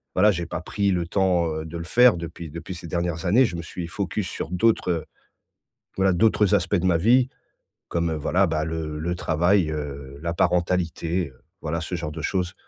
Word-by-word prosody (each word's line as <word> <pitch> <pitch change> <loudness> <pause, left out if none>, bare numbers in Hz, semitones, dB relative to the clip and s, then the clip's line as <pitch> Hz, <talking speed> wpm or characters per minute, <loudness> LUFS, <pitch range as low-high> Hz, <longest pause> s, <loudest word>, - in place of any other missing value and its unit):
voilà, 105 +3 +5
j'ai 85 -2 -3
pas 85 - -5
pris 100 +2 0
le 90 -2 0
temps, 90 -2 +2
heu, 80 0 -4
de 80 +1 -6
le 85 - -5
faire 125 +5 +5
depuis 85 -1 -7
depuis 85 +4 -7
ces 85 0 -8
dernières 85 0 -2
années. 110 +9 +5
Je 85 -5 -3
me - - -4
suis 85 +1 -6
focus 100 +1 -3
sur - - -5
d'autres, 95 +2 +2
heu, 85 -2 -2 0.9
voilà 95 -1 +3
d'autres 105 +2 +3
aspects 95 +2 -1
de 90 - -1
ma 85 -2 +3
vie, 120 +7 +4 0.6
comme, 85 -1 0
heu, - - -1
voilà, 75 - +2
bah, 75 0 -1
le 80 -1 -4
le 85 +2 -2
travail, 85 +1 +2
heu, 70 -2 -6
la 85 0 -2
parentalité, 85 -1 0
heu, 65 - -23 0.2
voilà 80 +1 -2
ce 90 +2 -4
genre 80 -3 -4
de 80 0 -6
choses. 90 0 -1
85 Hz, 210 wpm, -24 LUFS, 80-95 Hz, 0.9 s, voilà